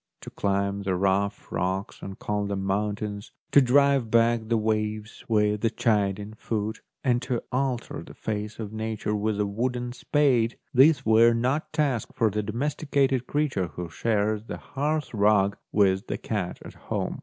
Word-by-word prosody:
To - - -9
climb 100 0 -1
the 95 -2 -1
rough 100 +2 0
rocks 95 +2 -2
and 95 0 -7
call 105 -1 -2
them 100 -1 -2
moun 100 +2 0
tains, 105 -1 -6 0.2
to 140 - +7
drive 140 -1 +3
back 115 0 +3
the 115 0 +2
waves 110 0 -2
with 105 -1 +2
a 115 - +4
chiding 105 -2 0
foot, 110 0 -3 0.2
and 120 -2 +2
to 125 -2 -2
alter 130 -2 -2
the - - -12
face 105 0 -4
of 110 -2 -6
Nature 110 -1 -3
with 105 0 -1
a 105 - +2
wooden 120 +4 -2
spade, 130 -4 +2 0.2
these 140 +4 +5
were 115 +1 +6
not 130 +6 0
tasks 140 -7 0
for 115 -4 +2
the 105 +2 -1
domesticated 135 +3 0
creature 140 -11 0
who 85 +3 -7
shares 105 +1 0
the - - -6
hearth 150 +1 -2
rug 100 -1 +3 0.2
with 95 0 +2
the - - -2
cat 100 -5 -3
at - - -9
home. - - -4
110 Hz, 165 wpm, -26 LUFS, 100-125 Hz, 0.2 s, to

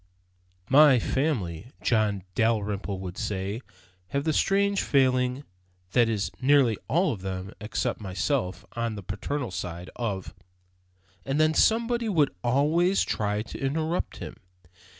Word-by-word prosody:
"My 145 -1 +7
Family," 115 - -1 0.2
John 105 -4 +1
Dalrymple 105 -2 0
would 90 -1 -6
say, 100 +3 -3 0.5
"have 140 +8 -1
the 160 0 +1
strange 200 +4 +2
failing 130 -1 +2 0.5
(that 120 +1 +4
is, 105 -3 -1
nearly 130 -5 +4
all 175 +3 +2
of 100 - -8
them 95 +1 -5
except 105 +1 -2
myself, 95 0 -2
on 115 -2 -2
the 100 - -7
paternal 120 +6 -3
side) 90 0 -6
of 100 -6 -3 0.5
" 90 +1 -36
And 135 +2 -1
then 155 0 +4
somebody 230 +4 +2
would 155 - +2
always 155 +9 +3
try 105 0 -1
to 115 - -9
interrupt 155 +5 -1
him. - - -8
115 Hz, 130 wpm, -27 LUFS, 95-145 Hz, 0.5 s, My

